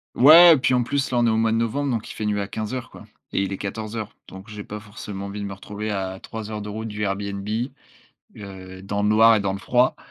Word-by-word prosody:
Ouais, 160 +5 +9
puis 130 - +1
en 125 -1 +3
plus 140 +3 -1
là 120 - +2
on 120 - +3
est - - +4
au 110 - +1
mois 110 0 +2
de - - +1
novembre, 115 +5 -1
donc 115 -4 -2
il - - -8
fait 110 - -4
nuit 105 -1 0
à 100 - -4
15:00, 115 +4 -4
quoi - - -13 0.3
et 100 - +1
il 100 - -3
est - - -4
14:00 110 +1 -5
donc 95 +3 -11
j'ai 105 -1 -8
pas 105 - -6
forcément 105 -2 -7
envie 100 +1 -6
de 100 - -4
me 100 - -5
retrouver 105 +2 -6
à 95 -2 -3
3 110 +1 -7
heures 105 - -4
de 105 - -7
route 110 +2 -5
du 105 0 -4
Airbnb, 100 0 -3 0.9
heu, 95 -2 -10
dans 100 +1 -2
le 105 - +2
noir 110 +2 +6
et 110 - +2
dans 100 -1 -1
le 95 - -5
froid, 125 +5 +2
105 Hz, 265 wpm, -23 LUFS, 100-115 Hz, 0.9 s, Ouais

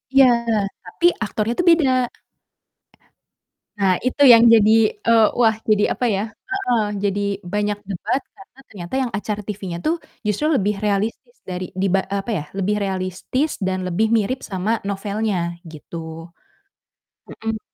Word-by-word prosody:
Iya, 270 - +8 0.6
tapi 180 - -3 0.2
aktornya 215 +3 -2
tuh, 355 - +2
beda. 325 -5 +5 1.9
Nah, 195 -2 +3
itu 255 +3 -1
yang 235 -3 +9
jadi, 215 -1 +5 0.3
eee, 230 -1 +6
wah, 225 -2 +4
jadi 210 -1 +4
apa 250 - -2
ya 195 - -1 0.3
heeh. 250 - 0 0.2
Jadi 200 0 0 0.3
banyak 210 0 0
debat 210 +8 -1 0.2
karena 195 +7 -17
ternyata 175 0 -7
yang 250 -3 -2
acara 210 0 -3
TV-nya 195 -4 -5
tuh 320 - +2 0.3
justru 210 +8 0
lebih 210 -3 +1
realistis 210 - -2
dari 185 0 -4
diba 195 0 +2
eee, 200 - -1
apa 230 - -5
ya 160 -8 -2
lebih 200 +2 0
realistis 190 - -2
dan 185 -1 -1
lebih 195 +5 +1
mirip 235 +5 0
sama 190 +3 -1 0.2
novelnya 205 0 -2 0.3
gitu. 155 +1 -11 1.3
Mhm. 225 -1 -5
210 Hz, 140 wpm, -21 LUFS, 195-230 Hz, 1.9 s, yang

